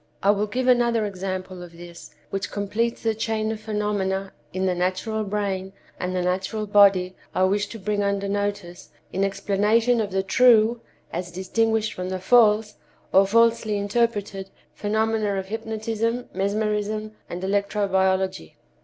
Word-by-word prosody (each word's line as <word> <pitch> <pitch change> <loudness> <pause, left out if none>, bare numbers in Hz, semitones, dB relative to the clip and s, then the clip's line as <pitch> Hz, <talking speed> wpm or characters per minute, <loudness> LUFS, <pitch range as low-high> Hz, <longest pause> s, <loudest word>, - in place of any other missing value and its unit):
I 200 - +6
will 210 +1 0
give 250 +5 -2
another 235 -3 +3
example 185 -2 -5
of 175 -1 -10
this, 170 0 -11 0.2
which 195 -1 -3
completes 215 +3 -2
the 225 -1 +2
chain 220 0 -1
of 220 - -5
phenomena 205 -3 -2 0.2
in 185 +1 -2
the 185 - +2
natural 185 +5 -1
brain 195 -2 -3 0.3
and 180 0 -2
the 180 - 0
natural 190 +4 -1
body 195 -3 +4 0.2
I 185 - +3
wish 200 +2 +2
to 225 - -8
bring 205 0 -1
under 200 0 0
notice 200 -3 -3 0.2
in 195 - 0
explanation 210 +4 +2
of 210 - -2
the 190 0 -1
true 230 +2 +4 0.3
as 175 +1 -3
distinguished 220 +5 0
from 180 0 -5
the 185 - -2
false, 210 +1 +4 0.4
or 195 +1 +6
falsely 230 0 +3
interpreted, 205 -2 -1 0.2
phenomena 215 -1 0
of 190 0 -4
hypnotism, 225 +2 -2
mesmerism 210 +1 -1 0.2
and 175 +2 -6
electro 200 +1 0
biology. 190 - 0
205 Hz, 150 wpm, -24 LUFS, 190-220 Hz, 0.4 s, I